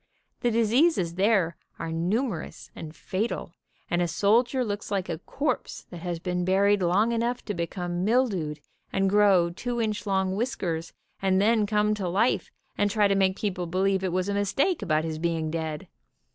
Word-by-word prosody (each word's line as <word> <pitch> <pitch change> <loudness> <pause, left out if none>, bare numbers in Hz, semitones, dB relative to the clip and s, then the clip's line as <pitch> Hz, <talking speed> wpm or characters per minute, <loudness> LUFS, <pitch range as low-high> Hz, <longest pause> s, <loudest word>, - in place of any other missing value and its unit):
The 240 - +1
diseases 230 - +2
there 190 -3 +2 0.2
are 165 - -4
numer 180 +4 -1
ous - - -14
and 155 0 -8
fatal, 190 -3 -3 0.3
and 175 - 0
a 175 - +1
soldier 235 - +2
looks 205 -1 -4
like 195 -3 -2
a 160 -2 -3
corpse 275 - -3
that 175 - -7
has 175 0 -3
been 180 +1 -2
buried 195 +2 +3
long 190 +6 +2
enough 235 +1 -1
to 205 - -2
become 175 0 -3
mildewed 195 - +1 0.3
and 195 0 +1
grow 195 -4 +4
two 240 +7 -4
inch 215 -2 -2
long 190 -1 +1
whiskers, 175 -8 -2 0.3
and 190 -1 +2
then 215 +1 +3
come 210 0 +2
to 195 -4 -2
life 205 +7 +1 0.3
and 205 - +3
try 205 0 +3
to 200 - +2
make 190 -1 +2
people 180 -4 -2
believe 190 +2 +1
it 185 - 0
was 185 +1 0
a 200 - -1
mistake 205 - +1
about 155 -5 +1
his 160 -1 -4
being 165 -2 -1
dead. 160 -2 -4
195 Hz, 180 wpm, -26 LUFS, 175-215 Hz, 0.3 s, grow